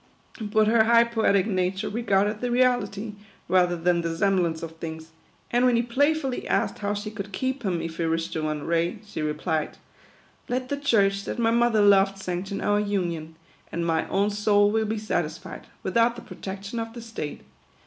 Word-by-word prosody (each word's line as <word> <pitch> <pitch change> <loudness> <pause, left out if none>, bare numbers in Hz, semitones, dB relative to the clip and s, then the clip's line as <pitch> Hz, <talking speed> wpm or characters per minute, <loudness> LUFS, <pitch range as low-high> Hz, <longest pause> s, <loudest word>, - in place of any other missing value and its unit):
But 215 0 +2
her 220 0 +5
high 235 +1 +6
poetic 220 -5 +2
nature 190 0 -1
regarded 210 -1 0
the 245 - -1
reality, 235 -4 +1 0.3
rather 180 -1 +3
than 170 +1 +2
the 165 -1 -3
sem 195 -1 +3
blance 165 -2 -1
of 160 0 -7
things; 160 0 -7 0.4
and 245 +1 +3
when 250 -1 +4
he 235 - +2
playfully 270 +2 0
asked - - 0
how 205 0 -1
she 210 +1 -5
could 200 -1 -7
keep 260 +6 -2
him 185 -6 -1
if 165 0 -6
he 165 - 0
wished 165 0 -1
to 160 - -2
run 155 -1 -2
away, 170 +6 0
she 205 - -6
re 150 0 0
plied, 155 +1 -2 0.4
" - - -32
Let 255 +1 -2
the 285 - -1
church 200 -8 +2
that - - -4
my 230 -1 +2
mother 235 -2 +3
loved 195 -1 +5
sanction 190 +1 -4
our 205 0 +2
union, 175 -6 -2 0.4
and 170 0 -2
my 165 -1 0
own 200 +2 +1
soul 205 0 +3
will 220 0 +1
be 220 +1 -1
satisfied, 175 -4 -4 0.2
without 230 +5 +2
the 240 - -9
protection 200 +4 -6
of 225 0 -5
the 235 - -8
state. 220 -10 -6
200 Hz, 195 wpm, -25 LUFS, 175-230 Hz, 0.4 s, high